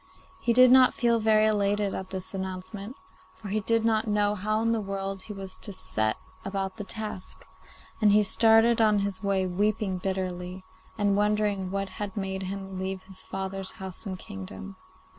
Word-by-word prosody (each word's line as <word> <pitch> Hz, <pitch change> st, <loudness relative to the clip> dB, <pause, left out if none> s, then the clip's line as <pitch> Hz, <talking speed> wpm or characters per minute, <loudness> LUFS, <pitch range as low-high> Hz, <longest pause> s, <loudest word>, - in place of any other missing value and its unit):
He 235 Hz, -, +1 dB
did 255 Hz, +1 st, +7 dB
not 255 Hz, -1 st, +7 dB
feel 235 Hz, -1 st, +2 dB
very 215 Hz, 0 st, +4 dB
elated 205 Hz, -1 st, +1 dB
at 190 Hz, 0 st, -5 dB
this 190 Hz, 0 st, -6 dB
announcement, 190 Hz, +4 st, -5 dB, 0.4 s
for 205 Hz, -, -9 dB
he 215 Hz, +2 st, +1 dB
did 230 Hz, +1 st, +1 dB
not 220 Hz, -1 st, +2 dB
know 205 Hz, -1 st, +2 dB
how 215 Hz, +2 st, -1 dB
in 230 Hz, -, +2 dB
the 225 Hz, -1 st, +1 dB
world 195 Hz, -1 st, -4 dB
he 215 Hz, -, -9 dB
was 195 Hz, -1 st, -4 dB
to 205 Hz, -, -7 dB
set 110 Hz, -, -1 dB, 0.3 s
about 195 Hz, -1 st, -3 dB
the -, -, -4 dB
task, 210 Hz, -2 st, -7 dB, 0.6 s
and 210 Hz, -1 st, +6 dB
he 210 Hz, +1 st, +5 dB
started 225 Hz, +2 st, +5 dB
on 215 Hz, -1 st, +5 dB
his 200 Hz, -2 st, -4 dB
way 195 Hz, -2 st, +1 dB
weeping 195 Hz, +1 st, 0 dB
bitterly, 185 Hz, -1 st, -3 dB, 0.3 s
and 205 Hz, -2 st, +2 dB
wondering 210 Hz, -2 st, +1 dB
what 195 Hz, +1 st, -2 dB
had 205 Hz, +2 st, -6 dB
made 190 Hz, -1 st, -2 dB
him 190 Hz, 0 st, -5 dB
leave 190 Hz, 0 st, -3 dB
his 190 Hz, 0 st, -9 dB
father's 195 Hz, 0 st, -5 dB
house 190 Hz, +2 st, -7 dB
and 190 Hz, -1 st, -4 dB
kingdom. 95 Hz, -, -8 dB
195 Hz, 180 wpm, -27 LUFS, 190-215 Hz, 0.6 s, did